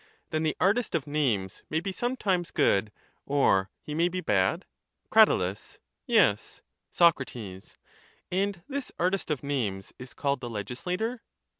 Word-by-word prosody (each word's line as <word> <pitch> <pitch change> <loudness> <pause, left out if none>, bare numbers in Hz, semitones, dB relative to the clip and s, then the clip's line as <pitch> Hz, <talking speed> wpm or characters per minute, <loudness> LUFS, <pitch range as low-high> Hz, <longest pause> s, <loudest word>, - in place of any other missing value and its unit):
Then 155 - 0
the 155 -1 0
artist 210 +2 +2
of 155 - 0
names 125 -11 -1
may 155 - +1
be 190 +4 -3
sometimes 195 -6 -1
good, 105 - +2 0.3
or 95 -9 +2
he 150 - -6
may 170 +3 +2
be 185 +1 -3
bad? 95 - +1 0.5
Crat. - - +8 0.8
Yes. - - +2 0.3
Soc. 170 -5 +4 1.1
And 190 -1 -1
this 280 -1 -4
artist 185 +1 0
of 150 -4 -2
names 110 -9 -2
is 125 0 -10
called 140 -2 -1
the 120 - -5
legislator? 180 - -3
155 Hz, 135 wpm, -28 LUFS, 125-185 Hz, 1.1 s, Crat